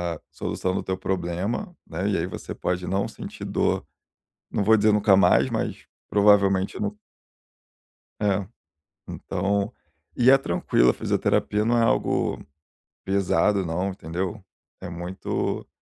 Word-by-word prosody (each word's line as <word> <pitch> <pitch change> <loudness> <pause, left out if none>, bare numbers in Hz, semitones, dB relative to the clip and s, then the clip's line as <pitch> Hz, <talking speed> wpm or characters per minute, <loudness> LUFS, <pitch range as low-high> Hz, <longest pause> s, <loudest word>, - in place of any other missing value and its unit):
a - - -12
solução 95 0 -2
do - - -2
teu 95 0 -2
problema, 95 - -3
né, 100 +3 -2
e 100 - +1
aí 80 - 0
você - - -7
pode 90 0 -2
não 95 +1 0
sentir - - -9
dor. - - 0 0.7
Não 100 - 0
vou 110 +2 +5
dizer 105 +1 +4
nunca 105 -1 +5
mais, - - +4
mas - - -3 0.2
provavelmente 100 -2 +3
no 105 0 -2 1.2
É, 100 -2 +1 0.6
então, 100 +2 -1 0.4
e 125 +1 +4
é 135 - +8
tranquilo, 60 - +2
a - - +3
fisioterapia 105 +1 0
não 120 +1 +2
é - - +4
algo 115 - +1 0.6
pesado 100 0 +2
não, 90 +4 -1
entendeu? 95 +3 -4 0.4
É 90 - -6
muito 90 +2 -3
100 Hz, 135 wpm, -25 LUFS, 90-105 Hz, 1.2 s, é